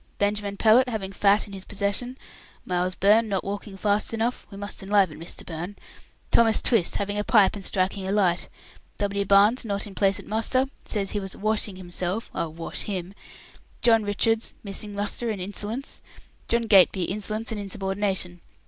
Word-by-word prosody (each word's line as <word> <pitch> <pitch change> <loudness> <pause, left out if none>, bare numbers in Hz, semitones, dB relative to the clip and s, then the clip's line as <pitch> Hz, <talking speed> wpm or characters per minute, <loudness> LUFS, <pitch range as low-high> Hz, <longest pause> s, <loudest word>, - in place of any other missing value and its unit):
Benjamin 205 0 -1
Pellett, 235 +5 +5
having 205 -5 -4
fat 200 +2 +3
in 200 - -12
his 190 -1 -4
possession. 205 +7 -2 0.5
Miles 180 0 -1
Byrne, 215 +4 +4
not 195 -2 -1
walking 200 0 -6
fast 210 +3 0
enough. 230 +2 -2
We 195 - -10
must 205 +1 -6
enliven 195 -5 +2
Mr. 165 - -6
Byrne. 175 +4 -6 0.6
Thomas 225 -2 +5
Twist, 220 -8 +2
having 205 +1 -2
a - - 0
pipe 210 -4 +4
and 200 - -6
striking 190 +1 0
a - - -1
light. 185 -4 +1 0.5
W. 200 0 -1
Barnes, 205 +6 +5
not 200 -3 -1
in 205 - -9
place 195 0 +2
at - - -10
muster; 225 +5 +1 0.2
says 200 -3 -2
he 205 - -1
was 195 -1 -6
'washing 215 -1 0
himself' 185 +3 -3
I'll 165 - -3
wash 165 +1 -3
him! 190 -2 -4 0.7
John 225 -2 +5
Richards, 220 +2 0
missing 205 0 -5
muster 205 +3 -2
and 210 -3 -3
insolence. 205 +7 -4 0.5
John 235 0 +2
Gateby, 195 -4 +5
insolence 215 +4 -2
and 215 -2 -3
insubordination. 195 -2 -2
205 Hz, 170 wpm, -25 LUFS, 190-215 Hz, 0.7 s, Pellett